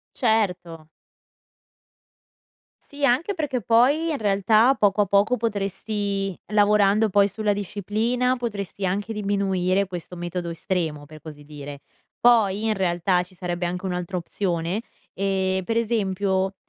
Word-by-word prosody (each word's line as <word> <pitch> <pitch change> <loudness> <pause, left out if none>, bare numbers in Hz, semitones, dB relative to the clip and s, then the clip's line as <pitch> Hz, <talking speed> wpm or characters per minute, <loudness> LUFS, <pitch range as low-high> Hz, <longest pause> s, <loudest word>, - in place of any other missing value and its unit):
Certo. 180 -9 -1 1.9
Sì, 285 0 -6
anche 280 +11 +2
perché 290 -7 -2
poi, 260 +9 +3
in 300 - -1
realtà, 215 +4 +3
poco 205 -2 +2
a - - 0
poco, 200 +6 +3
potresti 200 -2 -2
lavorando 210 0 +4
poi 200 0 +4
sulla 205 +1 -1
disciplina, 215 +6 -1
potresti 200 -5 -4
anche 205 +4 -2
diminuire 195 -2 0
questo 180 -1 -7
metodo 175 0 -4
estremo, 165 -4 -3
per 155 +1 -13
così 150 -2 -11
dire, 145 -1 -9 0.4
poi, 220 -3 +4
in 220 - +2
realtà, 180 -1 +1
ci 185 - -21
sarebbe 175 -1 -3
anche 180 +2 -4
un'altra 180 0 -3
opzione, 175 +1 -2 0.3
ehm, 190 -1 -1
per 225 +4 -2
esempio 195 -4 0
200 Hz, 125 wpm, -24 LUFS, 180-220 Hz, 1.9 s, lavorando